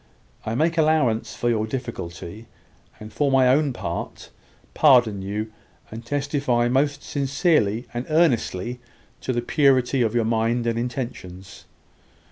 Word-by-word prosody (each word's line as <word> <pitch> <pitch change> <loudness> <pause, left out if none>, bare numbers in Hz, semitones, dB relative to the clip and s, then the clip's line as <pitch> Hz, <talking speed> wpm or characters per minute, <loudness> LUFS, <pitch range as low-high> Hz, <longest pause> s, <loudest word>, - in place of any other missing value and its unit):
I 110 - -1
make 165 +5 +1
allowance 150 -8 +1
for 120 - -2
your 110 -2 +1
difficulty, 110 -4 -6 0.5
and, 110 0 -10
for 145 -1 +1
my 130 -1 +4
own 145 +2 +3
part, 90 -7 -6 0.4
pardon 120 -9 +4
you, 105 +3 -4 0.4
and 115 +2 -8
testify 135 -2 0
most 140 +3 0
sincerely 135 - 0
and 120 +1 -4
earnestly 125 - +1 0.4
to - - -3
the 120 -1 -1
purity 135 -1 +2
of 115 -1 0
your 115 -2 +2
mind 115 +1 0
and 115 0 0
intentions. 115 -7 -6
120 Hz, 130 wpm, -23 LUFS, 110-140 Hz, 0.5 s, my